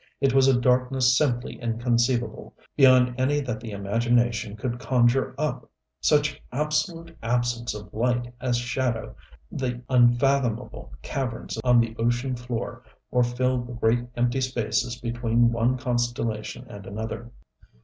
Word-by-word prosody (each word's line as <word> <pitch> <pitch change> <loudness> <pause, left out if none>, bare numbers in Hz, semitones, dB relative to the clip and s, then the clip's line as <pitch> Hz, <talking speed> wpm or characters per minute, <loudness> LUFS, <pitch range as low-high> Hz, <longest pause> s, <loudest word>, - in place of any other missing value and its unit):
It 135 -2 +2
was 135 0 +5
a 130 -2 +4
darkness 125 0 +3
simply 130 -4 0
inconceivable, 120 +1 0 0.2
beyond 130 -2 +6
any 145 +3 +2
that 125 -5 -4
the 115 0 -8
imagination 115 +2 0
could 120 +2 -3
conjure 130 +1 +2
up 155 +1 -3 0.3
such 145 -1 +2
absolute 155 +4 -2
absence 120 0 -1
of 105 -1 -10
light 120 +1 0
as 125 -2 +1
shadow 120 -1 -2 0.4
the 125 -2 -3
unfathomable 125 - +2
caverns 130 -4 -4
on 125 -1 +5
the 115 -1 0
ocean 120 +3 0
floor 120 -1 -5 0.3
or 125 - +3
fill 125 +1 +1
the 120 0 -8
great, 120 +1 +1
empty 120 +2 +1
spaces 120 -1 -1
between 120 0 +1
one 120 +2 +1
constellation 120 -3 -2
and 100 -1 -10
another. 110 +3 -5
120 Hz, 130 wpm, -25 LUFS, 120-130 Hz, 0.4 s, beyond